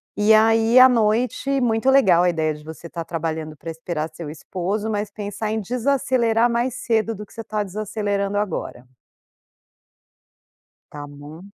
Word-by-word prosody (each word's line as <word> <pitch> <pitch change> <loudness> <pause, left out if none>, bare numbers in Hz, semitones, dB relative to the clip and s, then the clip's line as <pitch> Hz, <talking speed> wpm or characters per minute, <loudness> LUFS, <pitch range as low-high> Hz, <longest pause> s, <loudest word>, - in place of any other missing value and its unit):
E 210 +1 +4
aí, 225 +2 +5
à 255 - +10
noite 250 +4 +1
muito 235 +1 +1
legal 190 -11 +5
a 180 - +3
ideia 160 -2 0
de 150 0 -12
você 160 +2 -9
estar 170 0 -6
trabalhando 160 -2 -4
pra 165 - -8
esperar 160 -1 -4
seu 160 -1 -7
esposo, 190 +7 -4
mas 205 -1 -2
pensar 210 +1 -4
em 220 - -1
desacelerar 240 0 +1
mais 235 +1 -1
cedo 225 -2 0
do 210 0 -8
que - - -20
você 230 - -7
está 215 -1 -3
desacelerando 205 0 -2
agora. 165 -10 -4 2.1
Tá 145 -1 -8
bom. 145 +5 -12
210 Hz, 155 wpm, -22 LUFS, 165-225 Hz, 2.1 s, à